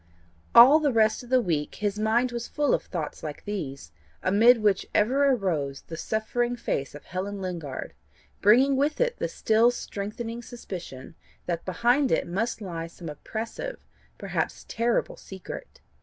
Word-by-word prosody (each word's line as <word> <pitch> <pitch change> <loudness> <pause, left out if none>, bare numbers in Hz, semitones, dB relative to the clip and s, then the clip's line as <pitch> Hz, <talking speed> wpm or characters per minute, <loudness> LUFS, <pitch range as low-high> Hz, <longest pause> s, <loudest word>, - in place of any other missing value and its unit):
All 255 +6 +10
the 295 -3 +2
rest 220 -2 +3
of 245 - -13
the 255 -1 +4
week 155 -5 -1
his 205 0 -2
mind 230 +3 +2
was 235 -1 -4
full 295 -2 +1
of - - +2
thoughts 160 -5 -5
like 150 -2 -7
these, 140 - -5 0.3
amid 230 +6 +6
which 200 -3 +2
ever 265 +7 +3
arose 165 - -1
the 165 - -8
suffering 240 +6 -1
face 140 - -3
of 145 - -11
Helen 195 +2 -4
Lingard, 170 -8 -5 0.5
bringing 255 +7 +5
with 290 +3 0
it - - 0
the - - 0
still 225 +2 +3
strengthening 230 +1 -5
suspicion 180 - -8 0.3
that 170 -2 -3
behind 245 +8 +2
it - - +2
must 220 +7 -2
lie 165 -4 -5
some 165 0 -9
oppressive, 225 - -6 0.3
perhaps - - -3
terrible 235 +1 0
secret. 190 - -9
215 Hz, 155 wpm, -26 LUFS, 175-245 Hz, 0.5 s, All